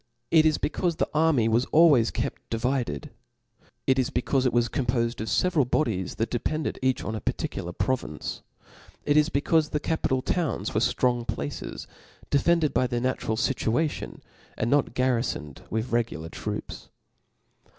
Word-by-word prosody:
It 160 -1 +6
is 155 - +2
becaufe 170 +1 -1
the - - +1
army 150 -7 +3
was 115 +3 +2
always 150 -8 +5
kept - - -3
divided; 130 +5 -2 0.7
it 130 0 +3
is 130 - +1
becaufe 130 +1 +1
it - - +1
was 120 0 +2
compofed 120 -2 -1
of 110 - -4
feveral 150 - +2
bodies 100 -13 0
that 115 - -2
depended 155 +6 -2
each 130 0 +1
on 110 - -3
a 110 - -4
particular 85 - -3
pro 130 +8 +1
vince; 75 -9 -7 0.6
it 145 - +2
is 150 +1 +4
becaufe 155 +2 +2
the 150 - -1
capital 130 -5 0
towns 170 -5 -1
were - - +2
ftix>ng 120 -2 +1
places, 70 0 -4 0.5
defended 160 +2 +3
by 125 - +2
their 120 -1 -1
natural 120 -3 -1
fituation, 135 +5 -1 0.4
aiKl 115 - 0
not 145 +1 +2
garhfoned 120 - -1
with 110 +3 -2
regular 110 -9 -1
troops. - - -6
130 Hz, 155 wpm, -26 LUFS, 115-150 Hz, 0.7 s, It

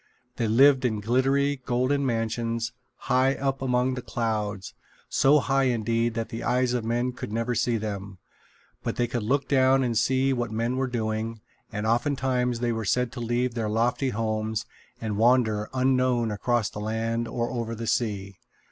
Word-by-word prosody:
They 115 - 0
lived 135 +4 +5
in 110 -4 0
glittering, 135 +5 +1
golden 130 +4 +1
mansions, 115 -1 -1 0.3
high 130 +2 +2
up 135 -1 -2
among 125 0 +1
the 125 - -4
clouds 105 -5 -3 0.4
so 140 +3 +4
high 135 -1 +2
indeed 115 -1 0
that 115 -1 -3
the 115 - -5
eyes 125 0 +1
of 120 -2 -1
men 120 +2 0
could 125 -4 -7
never 115 +2 -1
see 120 0 +1
them. 100 -3 -5 0.6
But - - -3
they 120 - +1
could 120 0 -3
look 135 +7 0
down 135 -1 +4
and 120 -2 -1
see 130 +4 +2
what 120 -2 -2
men 115 +3 -1
were 130 0 0
doing, 110 -1 -2 0.3
and 105 -1 -3
oftentimes 125 0 0
they 120 -1 +1
were 115 -1 -2
said 125 +3 +1
to - - -7
leave 120 +1 0
their 115 -2 -2
lofty 120 +5 +1
homes 110 -1 -2 0.3
and 110 -3 -3
wander 110 -2 +3
unknown 130 -3 +2
across 115 +1 0
the - - -7
land 115 +2 -2
or 120 0 -2
over 115 -2 -3
the 115 +1 -5
sea. 100 -5 -2
120 Hz, 175 wpm, -26 LUFS, 110-130 Hz, 0.6 s, lived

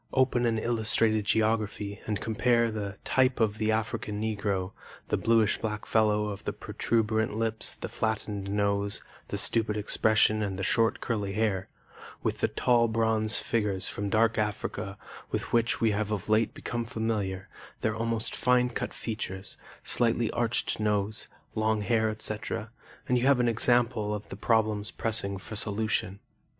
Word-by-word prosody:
Open 125 -2 +3
an 115 -1 +1
illustrated 110 -2 +3
geography 105 -2 0
and 105 -2 -1
compare 115 +1 +2
the 100 -2 -5
'Type 130 -1 +2
of 110 -2 +1
the 110 0 +2
African 110 -1 -2
Negro,' 100 -3 -1 0.4
the - - +2
bluish 115 -2 +2
black 105 -1 -3
fellow 105 -1 +2
of 100 - -6
the - - -3
protuberant 110 -1 -1
lips, 110 -1 +1
the - - -6
flattened 105 -3 -2
nose, 100 0 0 0.2
the - - -3
stupid 110 -2 +3
expression 110 +1 +3
and 100 -3 -2
the 95 - -3
short 115 +4 +2
curly 105 -4 -2
hair, 100 -3 0 0.5
with - - -1
the - - +2
tall 120 -1 +2
bronze 110 -1 +2
figures 105 -5 -1
from 100 0 -3
Dark 115 +1 +2
Africa 105 -1 -3 0.3
with - - -3
which 115 -1 +2
we 115 -1 +3
have 105 0 -1
of 105 -4 -3
late 110 +1 +2
become 120 -1 -3
familiar, 105 -4 -2 0.3
their 110 - +1
almost 115 0 -2
fine 125 0 +3
cut - - -4
features, 95 -4 -4 0.3
slightly 115 -1 +2
arched 120 -2 0
nose, 105 0 0 0.3
long 110 -1 +1
hair, 110 +1 +2
etc., 110 +1 -4 0.4
and 125 -1 +2
you 125 - +1
have 140 -2 +5
an 120 - +3
example 115 -2 +2
of 105 - -8
the - - -6
problems 110 -1 +1
pressing 105 -3 0
for 110 +3 -8
solution. 105 -3 -1
110 Hz, 155 wpm, -28 LUFS, 105-115 Hz, 0.5 s, have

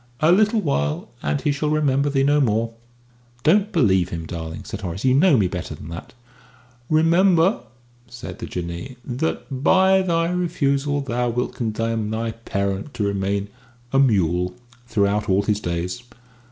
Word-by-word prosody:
A 155 +2 +4
little 210 +4 +4
while, 75 - -1
and 75 -1 -1
he 150 - +1
shall 150 +2 -1
remember 145 -2 +2
thee 135 -1 +1
no 145 +1 +3
more." 115 -2 0 0.7
"Don't 200 +7 +3
believe 95 - +3
him, 85 -1 -5
darling," 80 -1 -6
said 105 -2 -7
Horace; 95 +4 -4
"you 130 - +4
know 150 +1 +5
me 100 -4 +3
better 90 -1 -5
than 80 - -10
that." 85 +7 -9 0.7
"Remember," 170 +4 +4 0.5
said 125 0 -9
the - - -5
Jinnee, 85 +8 -5
"that 130 0 -3
by 190 +2 +5
thy 170 -2 +1
refusal 145 -5 0
thou 125 -2 -1
wilt 125 +2 -2
condemn 115 -1 -2
thy 115 +1 -2
parent 100 +2 -3
to 105 - -1
remain 100 0 -1 0.4
a 135 - +4
mule 90 -8 +2 0.3
throughout 105 -1 +1
all 95 +1 +3
his 105 0 0
days. 90 +4 -3
120 Hz, 155 wpm, -22 LUFS, 100-150 Hz, 0.7 s, know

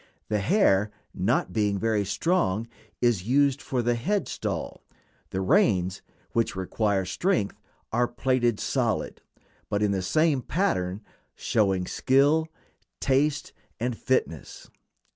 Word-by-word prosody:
The 105 -1 +1
hair, 105 - +3 0.2
not 90 - 0
being 105 -1 +1
very 110 0 +1
strong, 115 - 0 0.4
is 110 -6 +2
used 140 +2 +3
for 125 -2 -2
the 120 +1 +2
head 190 - -1
stall; - - -4 0.5
the 95 - -2
reins, 95 - +2 0.3
which 115 -4 0
require 95 +1 0
strength, 170 - -1 0.3
are 120 +2 +2
plaited 120 -2 0
solid, - - -1 0.5
but 105 +1 0
in 105 - +2
the 95 -1 0
same 150 - +2
pattern, 100 - -1 0.3
showing 95 -4 +1
skill, 145 - +2 0.5
taste, 145 +2 +1 0.3
and 120 +1 -1
fitness. 110 - -2
115 Hz, 120 wpm, -26 LUFS, 100-140 Hz, 0.5 s, hair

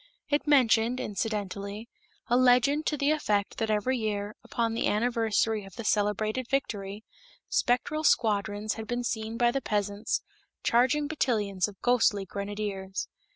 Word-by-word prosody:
It 295 +1 0
mentioned, 250 -3 +4
incidentally, 205 0 -3 0.4
a 245 - +2
legend 255 +4 +4
to 300 - 0
the 285 +2 +2
effect 210 -10 0
that 225 - 0
every 215 +5 +1
year, 210 -1 -2
upon 230 0 -1
the 230 - 0
anniversary 225 -1 +1
of 195 -1 -13
the 230 - -6
celebrated 215 +4 0
victory, 205 -6 -2 0.5
spectral 250 +6 +1
squadrons 215 -4 +1
had 220 -1 -7
been 245 0 -2
seen 220 -1 -3
by 240 0 +3
the 275 - -1
peasants 205 -1 -1 0.4
charging 260 +5 +3
battalions 210 - 0
of 205 -2 -12
ghostly 225 -5 +3
grenadiers. 200 -1 -4
220 Hz, 140 wpm, -28 LUFS, 205-245 Hz, 0.5 s, mentioned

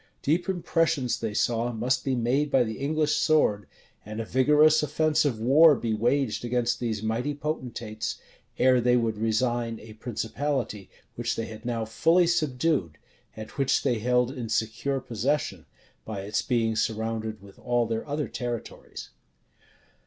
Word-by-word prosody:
Deep 170 +5 +1
impressions 165 -8 0
they 110 -2 -3
saw 115 +3 0
must 125 +3 0
be 135 -1 0
made 130 +5 +1
by 135 -3 +4
the 110 -2 -5
English 150 +2 +1
sword, 105 - +2 0.4
and 110 +1 -7
a 115 - -3
vigorous 150 +6 +4
offensive 150 -4 +1
war 145 +7 +6
be 115 -2 -2
waged 120 +3 0
against 120 0 0
these 110 -3 -2
mighty 120 +6 -1
potentates, 120 -7 -4 0.4
ere 130 -1 +4
they 125 +1 +3
would 115 -2 0
resign 115 +1 0
a 110 0 -12
principality 120 0 -3 0.2
which 120 0 -2
they 115 - -3
had 110 +1 -10
now 115 -2 -2
fully 165 +10 +3
subdued, 150 - 0 0.4
and 110 0 -8
which 135 -2 +1
they 125 -5 +1
held 125 +2 +2
in 120 -4 -6
secure 115 +5 -1
possession, 130 +5 -2 0.4
by 105 -3 -5
its 105 +2 -1
being 115 -4 0
surrounded 110 0 -2
with 100 0 -16
all 120 -1 +1
their 115 +2 -3
other 145 +1 -1
territories. 120 -2 -6
120 Hz, 150 wpm, -26 LUFS, 110-140 Hz, 0.4 s, war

